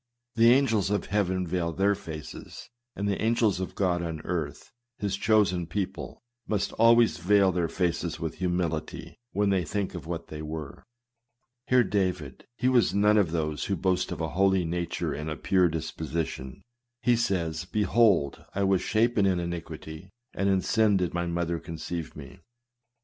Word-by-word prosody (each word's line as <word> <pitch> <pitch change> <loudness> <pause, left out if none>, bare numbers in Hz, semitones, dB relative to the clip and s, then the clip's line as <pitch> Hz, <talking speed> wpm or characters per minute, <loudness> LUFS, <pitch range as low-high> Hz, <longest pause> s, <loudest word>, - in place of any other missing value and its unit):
The 115 0 +5
angels 115 -7 +3
of 105 0 0
heaven 95 -3 0
veil 85 -1 -1
their 100 +4 +2
faces; 80 - -9 0.2
and 100 +1 -2
the 100 - -1
angels 110 -4 +2
of 95 - -5
God 90 -3 +1
on 80 -2 -4
earth, 80 -4 -4 0.3
his 100 -4 -1
chosen 100 -4 +2
people, 95 +6 -4 0.2
must 105 -2 -1
always 115 -2 +5
veil 95 +2 +4
their 90 -2 0
faces 85 -1 -1
with 80 -1 -5
humility, 90 -3 -2
when 100 0 +1
they 95 -2 +2
think 100 +3 -3
of 85 -3 -7
what 85 -1 -4
they 75 0 -6
were. 75 -2 -7 0.8
Hear 125 -1 +5
David: 90 - -2
he 125 - +1
was 125 -5 +3
none 105 +1 +4
of 95 -5 +2
those 75 -2 -2
who 100 - 0
boast 90 +1 0
of - - -4
a 80 - -1
holy 95 +1 +2
nature 85 +1 -2
and 75 +1 -4
a 80 - -3
pure 90 +5 +3
disposition. 80 -4 -4 0.4
He 120 0 +4
says, 90 -8 -1
" - - -28
Behold, 105 -8 +2
I 100 - +1
was 95 -2 +2
shapen 110 -1 +2
in 90 -2 +1
iniquity; 85 0 -6 0.2
and 100 0 0
in 95 -1 +3
sin 110 -2 +3
did 90 -3 -1
my 85 0 -1
mother 85 0 -1
conceive 80 0 -6
me." 75 +6 -11
90 Hz, 170 wpm, -27 LUFS, 80-100 Hz, 0.8 s, The